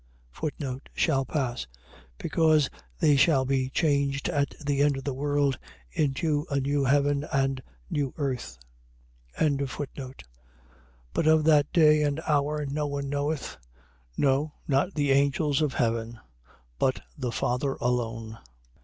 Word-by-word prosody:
Shall 135 -5 +2
pass.. 125 - -2 0.5
.Because 155 - +2 0.3
they 145 - +4
shall 135 -2 +4
be 130 -1 0
changed 140 -2 +1
at 145 -1 +1
the 145 -2 0
end 145 -1 +3
of 135 - -6
the 140 - -2
world 145 -1 0 0.3
into 150 +2 0
a 140 -1 +1
new 140 +1 0
heaven 140 +1 +2
and 135 -1 +1 0.3
new 140 - -1
earth. 130 - -3 0.8
24:36. 140 -2 -2 0.9
But 160 - +1
of 160 0 +5
that 150 -2 +4
day 155 -2 +5
and 145 0 0
hour 150 -1 0
no 145 +2 -2
one 140 -1 -3
knoweth: 145 - -2 0.6
no, 145 +2 +1
not 145 +7 +1
the 145 -2 +1
angels 140 +1 +2
of 150 -3 0
heaven, 115 -1 -1 0.6
but 130 - +1
the 125 -4 -3
Father 125 +4 0
alone. 115 -2 -2
140 Hz, 125 wpm, -27 LUFS, 135-150 Hz, 0.9 s, of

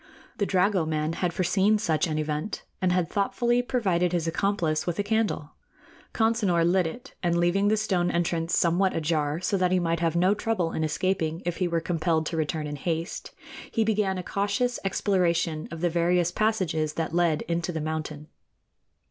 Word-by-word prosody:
The 200 - +1
dragoman 165 -5 +1
had 180 -2 0
foreseen 190 +4 +2
such 180 -4 0
an 155 -1 -2
event, 155 +5 -3 0.2
and 185 -1 +2
had 180 -2 +1
thoughtfully 240 +6 +1
provided 185 -9 0
his 170 -2 0
accomplice 170 -3 0
with 175 - -1
a 205 - 0
candle. 210 -8 -1 0.6
Consinor 220 -7 +2
lit 180 0 +3
it, 240 +10 -9
and, 170 -1 +1
leaving 175 +4 +2
the 215 +1 +3
stone 185 -5 +1
entrance 170 0 0
somewhat 180 +3 +2
ajar, 155 -1 0
so 195 +2 0
that 180 -1 +1
he 185 - +3
might 170 -2 0
have 165 -1 0
no 180 +3 +4
trouble 210 -6 -1
in 160 - -2
escaping 165 0 -1
if 175 -1 -2
he 180 - +1
were 170 -1 0
compelled 165 -1 0
to 165 - -3
return 155 -1 -1
in 145 0 -5
haste, 165 +3 -3 0.4
he 225 - +1
began 210 -3 +1
a 180 - -4
cautious 205 +7 -1
exploration 170 -5 0
of 165 -1 -7
the 175 - +3
various 175 +1 +2
passages 180 -8 0
that 165 0 -3
led 170 -3 +2
into 170 +1 -2
the 160 - -3
mountain. 155 -1 -4
175 Hz, 180 wpm, -26 LUFS, 160-195 Hz, 0.6 s, no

